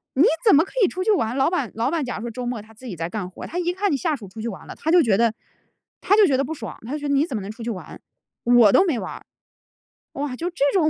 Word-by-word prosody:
你 275 Hz, -, +5 dB, 0.2 s
怎 420 Hz, -, +7 dB
么 305 Hz, -, +6 dB
可 -, -, -15 dB
以 375 Hz, -, +6 dB
出 370 Hz, -, -3 dB
去 435 Hz, -, +3 dB
玩， 240 Hz, -, +1 dB
老 270 Hz, -, +3 dB
板 290 Hz, -, -2 dB
老 225 Hz, +1 st, 0 dB
板 325 Hz, -4 st, -1 dB
假 250 Hz, -, -4 dB
如 220 Hz, -, -6 dB
说 235 Hz, -, -4 dB
周 250 Hz, +2 st, -5 dB
末 240 Hz, -3 st, -3 dB
他 220 Hz, +1 st, -17 dB
自 240 Hz, +4 st, -15 dB
己 195 Hz, -, -5 dB
在 165 Hz, 0 st, -4 dB
干 185 Hz, -1 st, -4 dB
活， 185 Hz, -, -9 dB
他 350 Hz, -, -4 dB
一 355 Hz, 0 st, 0 dB
看 400 Hz, +2 st, 0 dB
你 285 Hz, -, +1 dB
下 315 Hz, +2 st, 0 dB
属 215 Hz, -7 st, -10 dB
出 220 Hz, +4 st, -9 dB
去 230 Hz, -, -3 dB
玩 190 Hz, -, -9 dB
了， -, -, -8 dB
他 320 Hz, -, -2 dB
就 350 Hz, 0 st, +7 dB
觉 210 Hz, -5 st, +3 dB
得 230 Hz, 0 st, +3 dB, 0.7 s
他 405 Hz, -, +4 dB
就 430 Hz, -, +7 dB
觉 265 Hz, -3 st, +2 dB
得 275 Hz, -, +1 dB
不 320 Hz, -, -4 dB
爽， 230 Hz, -8 st, -7 dB
他 250 Hz, -, -5 dB
就 300 Hz, -, -2 dB
觉 290 Hz, -, -4 dB
得 -, -, +2 dB
你 280 Hz, +2 st, +3 dB
怎 275 Hz, -, -5 dB
么 -, -, -4 dB
能 195 Hz, +2 st, -6 dB
出 230 Hz, +2 st, -10 dB
去 235 Hz, -, -3 dB
玩， 185 Hz, -5 st, -8 dB, 0.4 s
我 240 Hz, -3 st, +6 dB
都 -, -, +6 dB
没 290 Hz, -, 0 dB
玩 -, -, -5 dB
儿。 -, -, -11 dB, 0.9 s
哇， 280 Hz, -2 st, -3 dB
就 340 Hz, +7 st, -3 dB
这 350 Hz, -, -14 dB
种 325 Hz, -5 st, +3 dB
260 Hz, 345 characters per minute, -23 LUFS, 225-330 Hz, 0.9 s, 怎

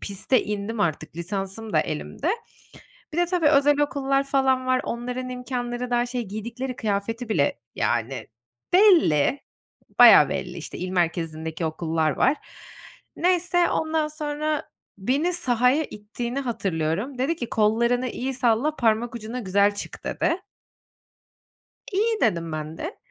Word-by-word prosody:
piste 200 Hz, +6 st, 0 dB
indim 210 Hz, +1 st, -3 dB
artık, 155 Hz, -2 st, -1 dB
lisansım 195 Hz, +4 st, -4 dB
da 155 Hz, -, +4 dB
elimde. 280 Hz, -, -3 dB, 0.8 s
Bir 330 Hz, -, -4 dB
de 350 Hz, -, +4 dB
tabii, 345 Hz, -3 st, +1 dB
özel 290 Hz, 0 st, +4 dB
okullar 275 Hz, -1 st, +1 dB
falan 265 Hz, -2 st, +1 dB
var. 255 Hz, 0 st, +2 dB
Onların 250 Hz, +2 st, -4 dB
imkânları 250 Hz, -1 st, -4 dB
daha 240 Hz, 0 st, +2 dB
şey, 245 Hz, 0 st, -3 dB
giydikleri 235 Hz, +5 st, -5 dB
kıyafeti 225 Hz, +3 st, -2 dB
bile 140 Hz, -, +1 dB, 0.2 s
yani 120 Hz, +3 st, -1 dB, 0.5 s
belli, 320 Hz, -, +5 dB, 0.6 s
bayağı -, -, +9 dB
belli, -, -, -4 dB
işte, -, -, -8 dB
il 180 Hz, -, -3 dB
merkezindeki 165 Hz, -2 st, -1 dB
okullar 160 Hz, 0 st, 0 dB
var. 285 Hz, -, +2 dB, 0.8 s
Neyse, 350 Hz, -1 st, +2 dB
ondan 315 Hz, -1 st, 0 dB
sonra 305 Hz, 0 st, -3 dB, 0.3 s
beni 275 Hz, -, +1 dB
sahaya 260 Hz, -2 st, +2 dB
ittiğini 235 Hz, +5 st, -5 dB
hatırlıyorum. 200 Hz, -, -2 dB
Dedi 300 Hz, +6 st, 0 dB
ki 240 Hz, -, -5 dB
"Kollarını 235 Hz, +4 st, +2 dB
iyi 260 Hz, +2 st, -3 dB
salla, 250 Hz, +4 st, +1 dB
parmak 230 Hz, 0 st, +1 dB
ucuna 230 Hz, +2 st, -5 dB
güzel 200 Hz, 0 st, +2 dB
çık." -, -, -8 dB
dedi. 330 Hz, -, 0 dB, 1.5 s
İyi 435 Hz, +3 st, +1 dB
dedim 165 Hz, -1 st, +1 dB
ben 155 Hz, +1 st, -5 dB
de. 330 Hz, +7 st, -6 dB
240 Hz, 130 wpm, -24 LUFS, 200-280 Hz, 1.5 s, bayağı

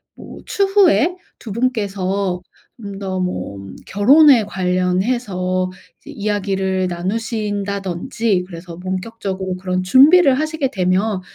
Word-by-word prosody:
뭐 -, -, -11 dB
추후에 390 Hz, -4 st, +3 dB, 0.2 s
2 225 Hz, -, -9 dB
분께서 200 Hz, -5 st, -1 dB, 0.3 s
좀 200 Hz, -4 st, -8 dB
더 190 Hz, -1 st, -3 dB
뭐 180 Hz, -, -3 dB, 0.3 s
결혼에 260 Hz, +4 st, +6 dB
관련해서 185 Hz, 0 st, -1 dB, 0.3 s
이 295 Hz, -, -9 dB
이야기를 195 Hz, -4 st, -1 dB
나누신다든지 200 Hz, 0 st, -2 dB
그래서 170 Hz, -1 st, -9 dB
본격적으로 190 Hz, 0 st, -4 dB
그런 185 Hz, 0 st, -2 dB
준비를 275 Hz, -, +6 dB
하시게 310 Hz, -3 st, -1 dB
되면 190 Hz, 0 st, 0 dB
200 Hz, 245 characters per minute, -19 LUFS, 185-235 Hz, 0.3 s, 결혼에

